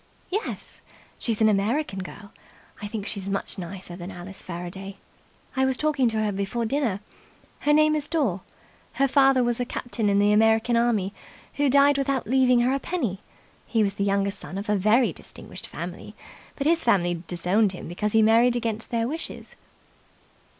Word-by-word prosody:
"Yes. 420 Hz, +4 st, -4 dB, 0.4 s
She's 225 Hz, -2 st, -2 dB
an 220 Hz, -, +6 dB
American 210 Hz, +2 st, +1 dB
girl. 200 Hz, +2 st, -9 dB, 0.5 s
I 205 Hz, -, -4 dB
think 205 Hz, -1 st, -5 dB
she's 200 Hz, -3 st, -4 dB
much 195 Hz, 0 st, -2 dB
nicer 180 Hz, 0 st, -7 dB
than 175 Hz, 0 st, -7 dB
Alice 185 Hz, +1 st, -9 dB
Faraday. 185 Hz, +3 st, -6 dB, 0.6 s
I 265 Hz, -, +2 dB
was 265 Hz, -1 st, +1 dB
talking 290 Hz, -4 st, +2 dB
to 220 Hz, -1 st, -1 dB
her 210 Hz, -, 0 dB
before 200 Hz, +4 st, -2 dB
dinner. 225 Hz, -5 st, 0 dB, 0.6 s
Her 295 Hz, -, +1 dB
name 305 Hz, +1 st, +5 dB
is 300 Hz, -1 st, -1 dB
Dore. 260 Hz, -, 0 dB, 0.5 s
Her 275 Hz, -, +2 dB
father 270 Hz, -1 st, +4 dB
was 240 Hz, 0 st, 0 dB
a -, -, +1 dB
captain 240 Hz, -3 st, -2 dB
in 200 Hz, -, +3 dB
the 205 Hz, +1 st, +4 dB
American 225 Hz, +2 st, +4 dB
army, 225 Hz, -5 st, +1 dB, 0.4 s
who 290 Hz, -1 st, +1 dB
died 280 Hz, +1 st, +5 dB
without 275 Hz, -1 st, 0 dB
leaving 255 Hz, 0 st, +4 dB
her 250 Hz, +2 st, +2 dB
a 275 Hz, -, 0 dB
penny. 250 Hz, -, -2 dB, 0.5 s
He 225 Hz, -2 st, +2 dB
was 200 Hz, -1 st, 0 dB
the 200 Hz, -, -2 dB
younger 200 Hz, 0 st, +1 dB
son 195 Hz, -1 st, -7 dB
of 200 Hz, +2 st, -5 dB
a 210 Hz, -, +3 dB
very 215 Hz, +6 st, +3 dB
distinguished -, -, -9 dB
family, -, -, -7 dB, 0.4 s
but 275 Hz, -, -3 dB
his 330 Hz, +2 st, +3 dB
family 175 Hz, -7 st, +2 dB
disowned 185 Hz, +4 st, +1 dB
him 180 Hz, -, -8 dB
because 210 Hz, +5 st, -2 dB
he 220 Hz, 0 st, +5 dB
married 230 Hz, +3 st, +5 dB
against 225 Hz, -2 st, -3 dB
their 230 Hz, -1 st, 0 dB
wishes." 320 Hz, +5 st, -6 dB
220 Hz, 180 wpm, -25 LUFS, 195-260 Hz, 0.6 s, an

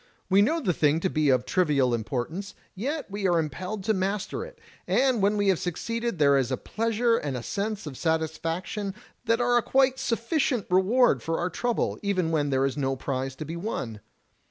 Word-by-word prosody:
We 195 Hz, +1 st, +6 dB
know 310 Hz, +11 st, +2 dB
the 200 Hz, -, 0 dB
thing 150 Hz, 0 st, +2 dB
to 190 Hz, -, 0 dB
be 155 Hz, -2 st, +2 dB
of 130 Hz, -1 st, +3 dB
trivial 145 Hz, -8 st, +2 dB
importance, 135 Hz, -, -3 dB, 0.2 s
yet 275 Hz, +9 st, -3 dB
we 200 Hz, -1 st, -1 dB
are 175 Hz, -2 st, +3 dB
impelled 185 Hz, +6 st, -3 dB
to 220 Hz, -, +2 dB
master 195 Hz, -, -2 dB
it, -, -, -11 dB, 0.3 s
and 255 Hz, -4 st, +2 dB
when 205 Hz, +2 st, +2 dB
we 205 Hz, -1 st, +2 dB
have 185 Hz, -, +2 dB
succeeded 230 Hz, +5 st, -3 dB
there 140 Hz, -2 st, +5 dB
is 130 Hz, -1 st, -1 dB
a 130 Hz, -, 0 dB
pleasure 230 Hz, +1 st, 0 dB
and 140 Hz, -, -3 dB
a 120 Hz, -, -6 dB
sense 205 Hz, -, -3 dB
of 145 Hz, -3 st, -6 dB
satisfaction 165 Hz, -, -2 dB, 0.3 s
that 230 Hz, 0 st, +2 dB
are 245 Hz, 0 st, +3 dB
a -, -, +4 dB
quite 265 Hz, +2 st, +2 dB
sufficient 245 Hz, -, 0 dB
reward 190 Hz, -, +4 dB
for 165 Hz, +4 st, -2 dB
our 180 Hz, +1 st, -1 dB
trouble, 240 Hz, +6 st, -1 dB
even 185 Hz, -5 st, 0 dB
when 150 Hz, -3 st, +1 dB
there 135 Hz, 0 st, +2 dB
is 135 Hz, -, -1 dB
no 135 Hz, -2 st, 0 dB
prize 130 Hz, 0 st, -3 dB
to 155 Hz, -, -6 dB
be 160 Hz, +3 st, -5 dB
won. 135 Hz, -, -4 dB
185 Hz, 200 wpm, -26 LUFS, 150-230 Hz, 0.3 s, We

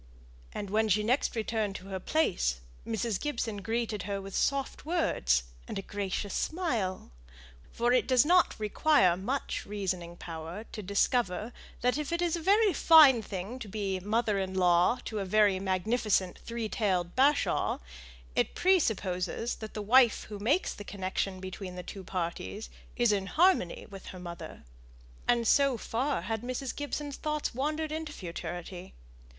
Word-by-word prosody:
And, 200 Hz, -2 st, -5 dB
when 220 Hz, +1 st, +2 dB
she 210 Hz, +2 st, +3 dB
next 245 Hz, +5 st, +1 dB
returned 220 Hz, -2 st, -1 dB
to 190 Hz, +1 st, -8 dB
her 190 Hz, -1 st, -3 dB
place, 175 Hz, -, 0 dB, 0.3 s
Mrs. 220 Hz, -2 st, -1 dB
Gibson 235 Hz, -7 st, -2 dB
greeted 220 Hz, +1 st, -2 dB
her 200 Hz, 0 st, -1 dB
with 195 Hz, 0 st, -8 dB
soft 275 Hz, -1 st, 0 dB
words 60 Hz, -, +1 dB, 0.2 s
and -, -, -5 dB
a 195 Hz, -, -4 dB
gracious 200 Hz, 0 st, -3 dB
smile; 230 Hz, -, -2 dB, 0.6 s
for 240 Hz, +1 st, +1 dB
it 255 Hz, -, +3 dB
does 255 Hz, 0 st, +5 dB
not 355 Hz, -4 st, +4 dB
require 210 Hz, -, +3 dB
much 250 Hz, +10 st, -3 dB
reasoning 185 Hz, -4 st, -4 dB
power 165 Hz, +4 st, -7 dB
to 215 Hz, -, -6 dB
discover, 205 Hz, +2 st, 0 dB, 0.3 s
that 250 Hz, +4 st, +2 dB
if 300 Hz, 0 st, -3 dB
it 340 Hz, -, 0 dB
is 345 Hz, -1 st, +1 dB
a 340 Hz, -, -4 dB
very 405 Hz, +3 st, +4 dB
fine 295 Hz, -7 st, +7 dB
thing 200 Hz, +5 st, -6 dB
to 225 Hz, -, -7 dB
be 195 Hz, -2 st, -2 dB
mother 210 Hz, +1 st, 0 dB
in 190 Hz, -1 st, -3 dB
law 180 Hz, +4 st, +4 dB
to 215 Hz, -, -3 dB
a -, -, -1 dB
very 200 Hz, 0 st, +3 dB
magnificent 190 Hz, 0 st, 0 dB
three 230 Hz, -1 st, -4 dB
tailed 185 Hz, -6 st, -1 dB
bashaw, 280 Hz, +3 st, +2 dB, 0.6 s
it -, -, +1 dB
presupposes 220 Hz, -, +1 dB
that 220 Hz, -1 st, -8 dB
the 210 Hz, -, -3 dB
wife 240 Hz, +2 st, +5 dB
who 205 Hz, -2 st, -6 dB
makes 280 Hz, -, +1 dB
the 205 Hz, -, -9 dB
connection 190 Hz, -1 st, -3 dB
between 185 Hz, 0 st, -7 dB
the 180 Hz, -, -6 dB
two 195 Hz, +1 st, -8 dB
parties 185 Hz, +4 st, -4 dB, 0.2 s
is 240 Hz, -2 st, +3 dB
in 195 Hz, -2 st, 0 dB
harmony 335 Hz, -, +2 dB
with 195 Hz, -1 st, -10 dB
her 185 Hz, -, -8 dB
mother. 170 Hz, -1 st, -8 dB, 0.6 s
And 235 Hz, -1 st, +2 dB
so 275 Hz, -1 st, +4 dB
far 255 Hz, -2 st, -1 dB
had 220 Hz, +2 st, -2 dB
Mrs. 255 Hz, +2 st, -4 dB
Gibson's 290 Hz, 0 st, -4 dB
thoughts 300 Hz, -1 st, -2 dB
wandered 305 Hz, +5 st, -2 dB
into 315 Hz, 0 st, -4 dB
futurity. 175 Hz, -, -7 dB
215 Hz, 160 wpm, -30 LUFS, 190-260 Hz, 0.6 s, fine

